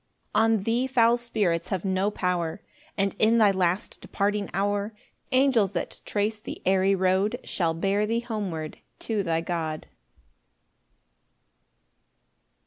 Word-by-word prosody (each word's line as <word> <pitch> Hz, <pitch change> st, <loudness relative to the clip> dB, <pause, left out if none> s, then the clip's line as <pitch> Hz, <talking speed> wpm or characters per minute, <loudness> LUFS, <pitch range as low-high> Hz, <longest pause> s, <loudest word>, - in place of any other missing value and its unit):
7 225 Hz, +1 st, +4 dB
On 195 Hz, -, -5 dB
thee 235 Hz, +4 st, +1 dB
foul 235 Hz, -3 st, +4 dB
spirits 205 Hz, -8 st, -1 dB
have 190 Hz, -1 st, -3 dB
no 190 Hz, +1 st, +1 dB
power; 180 Hz, -3 st, -2 dB, 0.4 s
And 195 Hz, -1 st, 0 dB
in 225 Hz, +2 st, +4 dB
thy 215 Hz, -3 st, +5 dB
last 185 Hz, +1 st, -1 dB
departing 205 Hz, 0 st, -1 dB
hour 205 Hz, +2 st, -1 dB, 0.4 s
Angels, 255 Hz, -7 st, +3 dB
that 170 Hz, -, -4 dB
trace 210 Hz, +1 st, -1 dB
the -, -, -7 dB
airy 190 Hz, +1 st, +3 dB
road, 190 Hz, +2 st, +1 dB
Shall 165 Hz, -3 st, -1 dB
bear 200 Hz, +5 st, +1 dB
thee 230 Hz, +2 st, 0 dB
homeward 195 Hz, -10 st, -4 dB, 0.2 s
to 220 Hz, -3 st, -1 dB
thy 165 Hz, -3 st, 0 dB
God. 165 Hz, -2 st, -3 dB
200 Hz, 130 wpm, -26 LUFS, 180-220 Hz, 0.4 s, thy